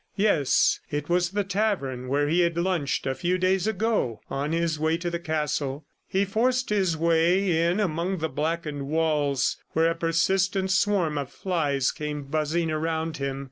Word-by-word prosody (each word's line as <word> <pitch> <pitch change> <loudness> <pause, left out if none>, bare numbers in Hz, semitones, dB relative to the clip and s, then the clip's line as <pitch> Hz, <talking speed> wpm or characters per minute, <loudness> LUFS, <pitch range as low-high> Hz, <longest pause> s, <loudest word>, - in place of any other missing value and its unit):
Yes, 195 -10 +3
it 145 +1 -3
was 175 0 +2
the 205 +2 -1
tavern 185 - -1
where 145 +2 +1
he 165 +4 +2
had 170 -1 +2
lunched 170 -5 0
a 135 - 0
few 175 +7 0
days 185 +1 +1
ago 215 - 0
on 140 +3 -2
his 165 -2 0
way 160 +1 +1
to 175 0 -3
the 170 - -2
castle. 150 -3 -2 0.2
He 195 +1 +1
forced 245 +5 0
his 190 -6 +1
way 170 +1 +2
in 180 +4 0
among 180 0 -1
the 160 -1 -1
blackened 150 -1 -3
walls 150 -3 +1 0.2
where 165 +1 +3
a - - -2
persistent 185 +3 +1
swarm 185 -6 +2
of 140 -2 -5
flies 145 -8 0
came 150 -1 -5
buzzing 155 +3 -1
around 160 +1 -2
him. 140 -1 -3
165 Hz, 170 wpm, -26 LUFS, 150-185 Hz, 0.2 s, Yes